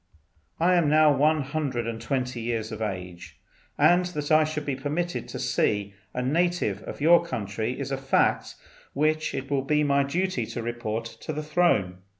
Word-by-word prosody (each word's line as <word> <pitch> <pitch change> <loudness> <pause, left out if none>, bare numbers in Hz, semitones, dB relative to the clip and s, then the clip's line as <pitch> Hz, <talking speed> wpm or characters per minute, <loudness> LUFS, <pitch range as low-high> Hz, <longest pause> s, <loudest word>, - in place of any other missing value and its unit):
I 175 +3 +4
am 170 -4 +3
now 155 -1 +5
one 150 +2 +3
hundred 135 -4 -2
and 115 -1 -4
twenty 125 -3 -2
years 115 -1 -3
of 110 0 -6
age, 90 -4 -6 0.4
and 175 +1 +5
that 150 -5 -4
I 155 0 +6
should 150 -1 -4
be 140 - -1
permitted 155 +6 -3
to - - -6
see 100 -1 0 0.2
a 125 - -3
native 175 +6 0
of - - -8
your 170 +3 +6
country 110 - -3
is 140 0 -4
a 135 - -1
fact 135 0 +1 0.4
which 155 +2 0
it 135 +2 -5
will 140 -1 +2
be 150 +2 +1
my 140 -1 +3
duty 140 -4 -1
to 120 - -5
report 115 -1 -3
to 115 - -7
the 155 +1 -4
Throne. 150 - +1
140 Hz, 180 wpm, -26 LUFS, 115-155 Hz, 0.4 s, I